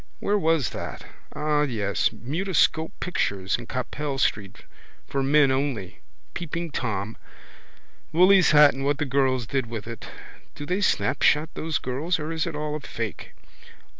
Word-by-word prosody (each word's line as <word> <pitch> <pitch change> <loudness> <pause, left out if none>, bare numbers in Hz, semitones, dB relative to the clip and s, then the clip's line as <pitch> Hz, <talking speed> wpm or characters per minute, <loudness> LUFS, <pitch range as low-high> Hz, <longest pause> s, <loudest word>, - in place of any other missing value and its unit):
Where 205 +1 +1
was 160 - +1
that? - - -6 0.3
Ah, 150 -1 +1
yes. 110 -8 0
Mutoscope 160 +3 0
pictures 100 - -1
in 120 -1 -9
Capel 140 +2 -3
street: 105 -6 -1 0.4
for 135 - -2
men 140 0 +4
only. 130 - -2 0.3
Peeping 170 -1 -4
Tom. 110 -4 -3 0.9
Willy's 185 +3 +6
hat 150 -1 +7
and 135 - -5
what 145 +1 +1
the 150 - -1
girls 130 -2 +1
did 130 +2 -1
with 115 -3 -6
it. 115 -1 -8 0.5
Do 145 - -7
they 180 +5 -1
snapshot 150 -2 +2
those 160 -2 -2
girls 145 +8 -1
or 155 0 -4
is 165 +2 -1
it 165 - -4
all 150 0 -3
a - - -3
fake? 115 -6 -6
145 Hz, 150 wpm, -25 LUFS, 120-160 Hz, 0.9 s, hat